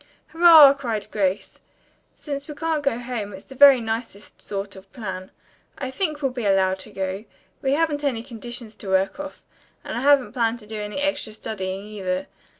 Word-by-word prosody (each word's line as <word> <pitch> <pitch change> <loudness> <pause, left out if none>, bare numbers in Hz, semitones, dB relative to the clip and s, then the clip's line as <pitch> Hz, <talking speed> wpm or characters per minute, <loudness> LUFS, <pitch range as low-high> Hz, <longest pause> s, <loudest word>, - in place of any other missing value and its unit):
"Hurrah!" 325 -4 +9
cried 235 -7 -3
Grace. 195 -2 -1 0.6
"Since 280 -2 -6
we 300 - -7
can't 320 -1 -1
go 275 -5 0
home, 240 -4 -5
it's 190 - -11
the - - -12
very 275 -1 +8
nicest 225 -2 -5
sort 200 0 -5
of 190 0 -14
plan. 190 -5 -6 0.5
I 260 -2 -4
think 305 0 -2
we'll 270 - +1
be 245 -4 -3
allowed 190 -1 +2
to 215 - -10
go. 190 +2 -4 0.4
We 270 -1 +1
haven't 295 -1 0
any 245 -6 -1
conditions 240 -2 -7
to 205 - -10
work 190 +9 +1
off, 290 0 -8 0.4
and - - -5
I 240 - -2
haven't 280 -1 +4
planned 230 -2 +1
to - - -14
do 215 0 -6
any 210 +5 -5
extra 285 -6 -1
studying 195 -3 -5
either. 190 -3 -3
230 Hz, 185 wpm, -23 LUFS, 200-280 Hz, 0.6 s, Hurrah